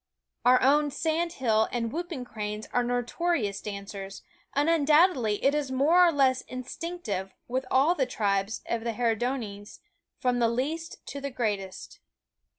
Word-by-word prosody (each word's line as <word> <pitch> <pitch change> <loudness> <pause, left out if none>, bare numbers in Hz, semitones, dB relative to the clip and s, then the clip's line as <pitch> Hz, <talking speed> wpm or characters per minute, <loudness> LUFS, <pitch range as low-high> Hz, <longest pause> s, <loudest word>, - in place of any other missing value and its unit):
Our 250 +1 +6
own 290 +2 +4
sand 325 +3 -1
hill 220 -7 +2
and 230 -2 -2
whooping 330 -5 -4
cranes 210 -2 -5
are 245 - +2
notorious 245 - -1
dancers; 200 -1 -7 0.3
and 290 +2 +2
undoubtedly 305 - +4
it 275 - +4
is 295 -2 -1
more 305 +8 +5
or - - +4
less 265 -4 +3
instinctive 255 - -5
with 255 +1 -2
all 275 +6 +4
the 270 -7 0
tribes 200 -3 -1
of 230 -1 -2
the 230 -1 -2
Herodiones, 225 -3 -2 0.4
from 250 -1 +1
the 230 -1 +3
least 310 +8 -3
to 280 - -6
the 280 - -3
greatest. 205 -7 -4
255 Hz, 150 wpm, -28 LUFS, 220-295 Hz, 0.4 s, Our